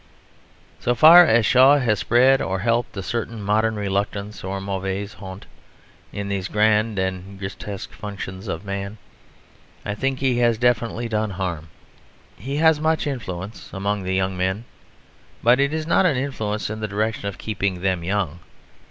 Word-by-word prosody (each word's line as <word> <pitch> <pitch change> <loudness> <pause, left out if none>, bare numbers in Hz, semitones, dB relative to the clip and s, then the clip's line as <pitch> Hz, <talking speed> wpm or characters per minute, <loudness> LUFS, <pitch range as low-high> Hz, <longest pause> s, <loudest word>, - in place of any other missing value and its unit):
So 120 - 0
far 165 +6 +9
as 115 -4 +4
Shaw 130 +5 +6
has 115 -7 +1
spread 130 +5 +4
or 95 0 -1
helped 115 +2 -1
a 95 - -3
certain 115 +2 -3
modern 110 +2 +1
reluctance 100 +1 -3
or 95 +1 -3
mauvaise 95 +1 -4
honte 95 0 -10 0.7
in 100 0 -5
these 100 -1 -2
grand 105 +1 +2
and 95 +1 -3
grotesque 95 0 -7
functions 100 -1 -7
of 85 +1 -4
man 100 +1 -4 0.9
I 105 - -2
think 135 +5 -1
he 130 -2 +1
has 120 -2 +3
definitely 120 0 0
done 110 -1 -1
harm. 90 -5 -4 0.7
He 135 +9 -5
has 160 0 +4
much 160 +1 +1
influence 105 -7 -5
among 100 +1 -2
the 95 0 -2
young 95 0 0
men; 95 +5 -2 0.8
but 120 +2 +5
it 140 +1 +2
is 155 0 -2
not 180 +3 +3
an 145 -7 +1
influence 110 -6 -3
in 110 - -5
the 110 - -2
direction 105 +1 -2
of 100 - -5
keeping 100 -4 -2
them 95 -2 0
young. 90 -3 -2
105 Hz, 160 wpm, -22 LUFS, 95-120 Hz, 0.9 s, far